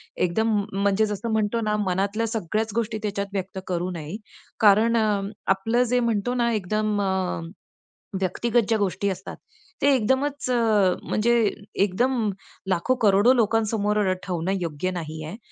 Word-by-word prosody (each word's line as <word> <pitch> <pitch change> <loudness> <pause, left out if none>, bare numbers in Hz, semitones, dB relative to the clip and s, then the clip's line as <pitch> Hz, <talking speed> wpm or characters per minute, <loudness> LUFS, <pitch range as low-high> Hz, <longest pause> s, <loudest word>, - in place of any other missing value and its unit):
एकदम 200 +6 +1
म 205 - 0 0.2
म्हणजे 200 +2 +3
जसं 210 +2 -3
म्हणतो 220 +1 0
ना 210 -1 0
मनातल्या 200 +5 0
सगळ्याच 220 0 -2
गोष्टी 225 -1 -1
त्याच्यात 200 -1 -2
व्यक्त 190 -1 -4
करू 180 0 -1
नये, 165 0 -6 0.4
कारण 220 +2 +5
अ, 210 -3 +2 0.3
आपलं 225 +6 +2
जे 250 - +3
म्हणतो 235 0 0
ना, 240 -1 +1
एकदम 215 +1 0
अ, 190 -3 -1 0.8
व्यक्तिगत 230 +6 +1
ज्या 225 - +3
गोष्टी 200 0 0
असतात, 190 0 -6 0.5
ते 285 0 +5
एकदमच 265 +4 0
अ, 215 -6 +3
म्हणजे 235 +3 +1 0.5
एकदम 230 +3 +1 0.4
लाखो, 190 +8 +1
करोडो, 205 +5 +5
लोकांसमोर 210 -3 +1
ठेवणं 180 0 -2
योग्य 170 +2 -2
नाही 160 -3 -5
आहे. 170 +7 -7
210 Hz, 145 wpm, -24 LUFS, 190-230 Hz, 0.8 s, कारण